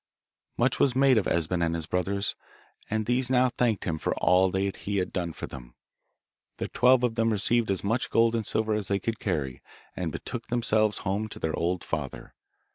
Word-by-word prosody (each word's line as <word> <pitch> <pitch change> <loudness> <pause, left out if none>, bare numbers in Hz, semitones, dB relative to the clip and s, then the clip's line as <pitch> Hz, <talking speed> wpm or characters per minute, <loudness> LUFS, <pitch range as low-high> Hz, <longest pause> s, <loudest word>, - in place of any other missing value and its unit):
Much - - +1
was 130 -3 +3
made 135 -1 +5
of 100 - -2
Esben 85 +1 0
and 85 0 0
his 80 -1 -3
brothers, 95 +3 -1 0.6
and 110 0 -1
these 125 +2 +1
now 130 0 +4
thanked 120 -3 0
him 80 -3 -2
for - - -1
all 95 +1 +4
that 95 +1 -1
he 100 0 -3
had 90 -1 -1
done 85 -3 -2
for - - -6
them. - - -11 0.8
The - - -4
twelve 125 0 +4
of 120 -2 +2
them 115 0 +1
received 115 +2 +1
as 95 -2 0
much 115 +5 0
gold 115 0 +3
and 115 -1 0
silver 110 +1 0
as 105 -2 -2
they 100 - +1
could 115 +3 -3
carry, 70 -10 -2 0.3
and - - -3
betook - - -6
themselves 110 -3 +1
home 100 +3 -1
to - - -8
their 80 - -2
old 90 +1 -1
father. 75 -5 -5
100 Hz, 200 wpm, -27 LUFS, 90-115 Hz, 0.8 s, made